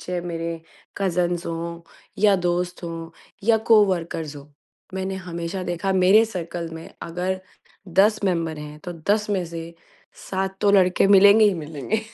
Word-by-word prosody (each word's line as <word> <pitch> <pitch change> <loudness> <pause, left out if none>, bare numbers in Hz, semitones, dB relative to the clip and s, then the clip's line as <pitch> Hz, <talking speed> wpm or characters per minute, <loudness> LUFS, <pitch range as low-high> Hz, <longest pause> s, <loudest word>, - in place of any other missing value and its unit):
चाहे 180 -1 -3
मेरे 165 -1 -4 0.4
कज़िन्स 175 -2 0
हों 170 0 -4 0.4
या 205 -2 +6
दोस्त 180 0 -2
हों 165 -1 -6 0.4
या 225 - +6
को-वर्कर्स 170 -8 +2
हों। 140 - -10 0.5
मैंने 190 0 -3
हमेशा 175 0 -5
देखा 180 +2 -1
मेरे 190 +4 +5
सर्कल 175 -4 -5
में 160 0 -8
अगर 180 +2 -3 0.5
10 205 +5 +3
मेंबर 165 -4 -1
हैं, 150 0 -8
तो 175 +3 -6 0.2
10 210 0 +2
में 190 -3 0
से 165 0 -8 0.6
7 190 0 -2
तो 205 - +5
लड़के 185 -1 +4
मिलेंगे 200 +2 +7
ही 205 -2 +4
मिलेंगे। 160 +6 -3
180 Hz, 150 wpm, -23 LUFS, 165-195 Hz, 0.6 s, मिलेंगे